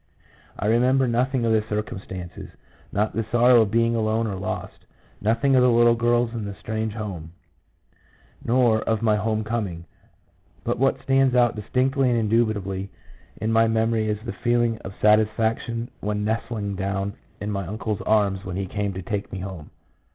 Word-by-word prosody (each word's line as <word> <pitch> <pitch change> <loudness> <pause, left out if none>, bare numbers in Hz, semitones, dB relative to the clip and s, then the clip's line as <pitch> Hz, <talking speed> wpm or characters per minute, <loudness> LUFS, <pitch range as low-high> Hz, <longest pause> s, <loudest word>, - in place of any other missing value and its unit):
I - - -3
remember 125 +4 +3
nothing 125 +1 +1
of 115 - +2
the 110 -1 +2
circumstances 95 -4 -5 0.2
— - - -29
not 105 +2 0
the 115 - -1
sorrow 120 0 +6
of 110 - +1
being 115 +2 +2
alone 110 0 +1
or 105 - -2
lost, 95 0 -5 0.3
nothing 115 +6 +2
of 130 - +5
the 125 - +5
little 120 0 +5
girls 120 0 +1
and 110 -3 -4
the 100 - -6
strange 110 +1 -3
home, 95 -7 -6 1.1
nor 120 -2 +3
of 110 0 -1
my 110 -2 +4
home 110 +1 -1
coming; 105 -7 -3 0.8
but - - -2
what 135 +1 +2
stands 135 -1 +3
out 120 -2 +4
distinctly 130 +5 +1
and 120 - +2
indubitably 105 -4 0 0.5
in 110 +1 -1
my 115 0 +4
memory 110 -1 +1
is 105 - 0
the 115 - -4
feel 120 0 +1
ing 115 -1 -1
of 95 +1 -9
satisfaction 110 +2 +1
when 105 0 -2
nestling 110 -2 -2
down 100 +1 -2 0.3
in 105 0 -3
my 100 -3 -3
uncle's 105 0 -3
arms 100 -3 +1
when 90 -2 -5
he 100 0 -2
came 100 +1 -3
to 95 0 -6
take 100 +2 -4
me - - -5
home. 95 -6 -7
110 Hz, 175 wpm, -24 LUFS, 100-120 Hz, 1.1 s, sorrow